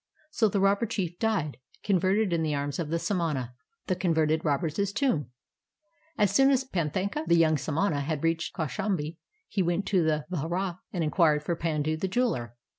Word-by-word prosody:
So 225 Hz, -7 st, +3 dB
the 200 Hz, -, 0 dB
robber 200 Hz, +4 st, +3 dB
chief 180 Hz, -6 st, -3 dB
died 200 Hz, -10 st, 0 dB, 0.3 s
converted 195 Hz, +1 st, +2 dB
in 165 Hz, -, +1 dB
the 155 Hz, -2 st, 0 dB
arms 140 Hz, +1 st, -3 dB
of 160 Hz, -3 st, -2 dB
the 165 Hz, -, 0 dB
samana. 165 Hz, -, -1 dB, 0.3 s
THE 185 Hz, -, 0 dB
COX\'ERTED 160 Hz, -3 st, +1 dB
ROBBER'S 160 Hz, +6 st, 0 dB
TOMB 185 Hz, -, +1 dB, 0.9 s
As 205 Hz, -3 st, +2 dB
soon 270 Hz, 0 st, +5 dB
as 265 Hz, -1 st, +3 dB
Panthaka. 190 Hz, -, -2 dB
the 170 Hz, -, +5 dB
young 160 Hz, -1 st, +4 dB
samana. 150 Hz, +2 st, 0 dB
had 150 Hz, +1 st, -3 dB
reached 165 Hz, 0 st, 0 dB
Kaushambi, 160 Hz, 0 st, -2 dB, 0.3 s
he 195 Hz, -, -1 dB
went 175 Hz, +2 st, 0 dB
to 190 Hz, -3 st, +2 dB
the 155 Hz, -1 st, 0 dB
vihara 175 Hz, +2 st, -2 dB
and 175 Hz, -3 st, -1 dB
inquired 155 Hz, -2 st, +3 dB
for 170 Hz, -, -1 dB
Pandu 155 Hz, -2 st, -1 dB
the 190 Hz, -, -1 dB
jeweler. 185 Hz, -, -1 dB
170 Hz, 175 wpm, -28 LUFS, 155-195 Hz, 0.9 s, soon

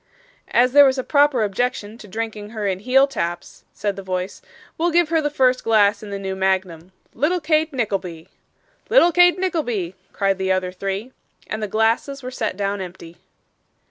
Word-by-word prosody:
'As 245 Hz, +1 st, +3 dB
there 285 Hz, +2 st, +8 dB
was 265 Hz, 0 st, +2 dB
a 260 Hz, -, -2 dB
proper 285 Hz, -5 st, +3 dB
objection 215 Hz, +1 st, -2 dB
to 210 Hz, -, -12 dB
drinking 215 Hz, 0 st, -5 dB
her 215 Hz, -2 st, -5 dB
in 190 Hz, -2 st, -1 dB
heel 255 Hz, +6 st, +4 dB
taps,' 175 Hz, -11 st, -5 dB
said 205 Hz, -1 st, -3 dB
the 195 Hz, -, -7 dB
voice, 185 Hz, 0 st, -4 dB, 0.3 s
'we'll 340 Hz, +2 st, +1 dB
give 340 Hz, -1 st, +2 dB
her 325 Hz, -1 st, +2 dB
the 295 Hz, -, 0 dB
first 255 Hz, -3 st, +2 dB
glass 205 Hz, -2 st, +3 dB
in 210 Hz, -, -9 dB
the 200 Hz, -, -4 dB
new 190 Hz, -1 st, -4 dB
magnum. 190 Hz, -2 st, -1 dB, 0.2 s
Little 320 Hz, +8 st, 0 dB
Kate 315 Hz, 0 st, +1 dB
Nickleby!' 195 Hz, -, -3 dB, 0.6 s
'Little 430 Hz, -7 st, +5 dB
Kate 355 Hz, +2 st, +5 dB
Nickleby,' 260 Hz, -, -2 dB, 0.2 s
cried 195 Hz, -1 st, 0 dB
the 190 Hz, 0 st, 0 dB
other 185 Hz, -1 st, 0 dB
three. 195 Hz, +6 st, -4 dB, 0.3 s
And 215 Hz, -, -5 dB
the 210 Hz, -, -2 dB
glasses 225 Hz, +6 st, 0 dB
were 255 Hz, -, -5 dB
set 220 Hz, -6 st, -3 dB
down 200 Hz, 0 st, -2 dB
empty. 175 Hz, -2 st, -10 dB
215 Hz, 180 wpm, -21 LUFS, 190-275 Hz, 0.6 s, there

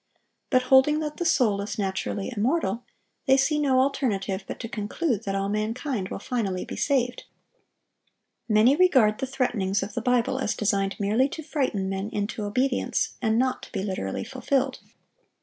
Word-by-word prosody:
But 255 Hz, -2 st, +3 dB
holding 270 Hz, +4 st, +5 dB
that 300 Hz, -1 st, -4 dB
the 345 Hz, -, -2 dB
soul 225 Hz, -11 st, +3 dB
is 200 Hz, +1 st, -5 dB
naturally 195 Hz, +2 st, -2 dB
immortal, 235 Hz, -, 0 dB, 0.4 s
they 265 Hz, 0 st, +6 dB
see 300 Hz, +3 st, +2 dB
no 270 Hz, -3 st, +3 dB
alternative 215 Hz, -8 st, 0 dB
but -, -, -6 dB
to 230 Hz, -, -4 dB
conclude 225 Hz, -, -2 dB
that 195 Hz, 0 st, -1 dB
all 195 Hz, 0 st, 0 dB
mankind 215 Hz, +1 st, -2 dB
will -, -, -4 dB
finally 195 Hz, -5 st, -2 dB
be -, -, -7 dB
saved. 250 Hz, -3 st, 0 dB, 1.2 s
Many 220 Hz, +5 st, +5 dB
regard 260 Hz, -12 st, +4 dB
the 265 Hz, -, -2 dB
threatenings 215 Hz, -7 st, 0 dB
of 200 Hz, -, -6 dB
the 240 Hz, -, -2 dB
Bible 250 Hz, +2 st, +1 dB
as 240 Hz, -, -1 dB
designed 200 Hz, -2 st, 0 dB
merely 215 Hz, +7 st, +2 dB
to 315 Hz, -, -7 dB
frighten 265 Hz, -11 st, -1 dB
men 195 Hz, +2 st, -3 dB
into 210 Hz, 0 st, -3 dB
obedience, 250 Hz, +5 st, 0 dB
and 220 Hz, -2 st, +2 dB
not 255 Hz, +1 st, +1 dB
to -, -, -12 dB
be 195 Hz, -3 st, -3 dB
literally 185 Hz, -, -3 dB
fulfilled. 260 Hz, +1 st, -1 dB
230 Hz, 165 wpm, -26 LUFS, 200-265 Hz, 1.2 s, they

